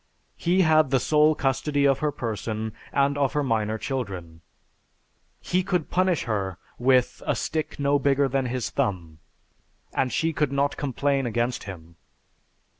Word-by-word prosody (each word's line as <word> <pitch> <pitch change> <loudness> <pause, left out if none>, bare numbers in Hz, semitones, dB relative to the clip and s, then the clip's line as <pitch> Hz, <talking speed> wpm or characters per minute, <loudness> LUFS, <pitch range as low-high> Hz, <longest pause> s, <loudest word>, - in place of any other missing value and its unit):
He 180 +2 +2
had 155 -3 +4
the 135 -1 +3
sole 155 +2 +4
custody 140 +1 0
of 135 -2 +3
her 150 -1 0
person 110 -2 -4 0.2
and 140 +1 +1
of 140 -2 +1
her 150 - +1
minor 110 -4 0
children. 95 -11 -5 1.0
He 180 - 0
could 180 -4 -2
punish 185 -3 +2
her 100 -5 -2 0.2
'with 125 0 +2
a - - +2
stick 155 -1 -3
no 140 0 +2
bigger 140 0 +2
than 135 0 0
his 125 -1 -3
thumb' 85 -6 -2 0.7
and 130 - 0
she 165 0 0
could 150 -3 0
not 140 +1 +1
complain 140 -1 0
against 120 0 -1
him.... 85 -4 -10
135 Hz, 150 wpm, -25 LUFS, 110-145 Hz, 1.0 s, had